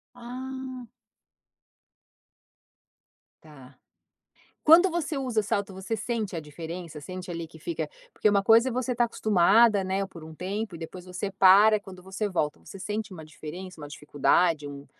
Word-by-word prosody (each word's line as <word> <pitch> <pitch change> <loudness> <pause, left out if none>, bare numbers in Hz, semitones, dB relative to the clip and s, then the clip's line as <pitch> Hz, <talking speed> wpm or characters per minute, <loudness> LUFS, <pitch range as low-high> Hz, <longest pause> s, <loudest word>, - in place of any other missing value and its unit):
Ah. 255 0 -7 2.6
Tá. 135 -4 -16 0.9
Quando 345 +4 +7
você 320 -3 -2
usa 245 -5 0
salto 200 -1 -2
você 190 +4 -3
sente 215 -4 -3
a - - -3
diferença? 160 +1 -8
Sente 185 +3 -8
ali 165 -1 -5
que 160 - -15
fica 160 -1 -4 0.2
porque 215 - +2
uma 200 -1 +3
coisa 225 +5 +5
é - - -3
você 255 +1 -1
está 240 0 +2
acostumada, 215 0 +4
né, 190 +1 -1
por 170 -4 -13
um 160 0 -10
tempo 195 +2 -4
e - - -11
depois 175 +2 -8
você 185 +2 -4
para, 205 +3 +6
quando 185 -2 -12
você 190 +3 -3
volta, 150 -5 -2
você 195 - -11
sente 210 +1 -4
uma 160 -3 -9
diferença, 165 +3 -9
uma 145 - -8
dificuldade, 150 +2 +1
um 140 0 -9
190 Hz, 155 wpm, -27 LUFS, 165-225 Hz, 2.6 s, Quando